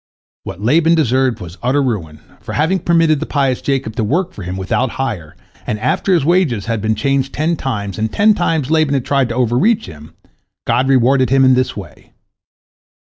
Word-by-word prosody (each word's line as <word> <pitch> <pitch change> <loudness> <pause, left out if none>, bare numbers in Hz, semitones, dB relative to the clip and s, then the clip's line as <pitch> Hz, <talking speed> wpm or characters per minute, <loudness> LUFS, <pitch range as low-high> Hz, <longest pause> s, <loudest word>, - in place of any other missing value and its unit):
What - - -7
Laban 165 +7 +3
deserved 130 -5 +1
was 85 +1 -10
utter 135 +3 +1
ruin, 85 - -4 0.2
for - - -8
having 165 +6 +1
permitted 165 -3 +2
the - - -4
pious 135 -4 0
Jacob 135 -5 -2
to 115 - 0
work 175 - -1
for - - -10
him 90 +1 -5
without 100 +7 -1
hire, 105 -13 -4 0.3
and 105 - -2
after 130 - 0
his 155 -5 0
wages 155 - +1
had 115 -2 -2
been 110 +1 0
changed 135 +4 -1
ten 160 +3 0
times, 105 - -4
and 110 0 -1
ten 215 +1 +4
times 160 -6 -1
Laban 155 -3 +2
had 135 - -2
tried 135 -3 +1
to 115 - -4
overreach 130 - +1
him, 75 +1 -13 0.5
God 130 +2 +1
rewarded 130 -1 +3
him 135 0 +4
in 130 - +5
this 130 -2 0
way. 95 -4 -11
130 Hz, 195 wpm, -16 LUFS, 110-155 Hz, 0.5 s, in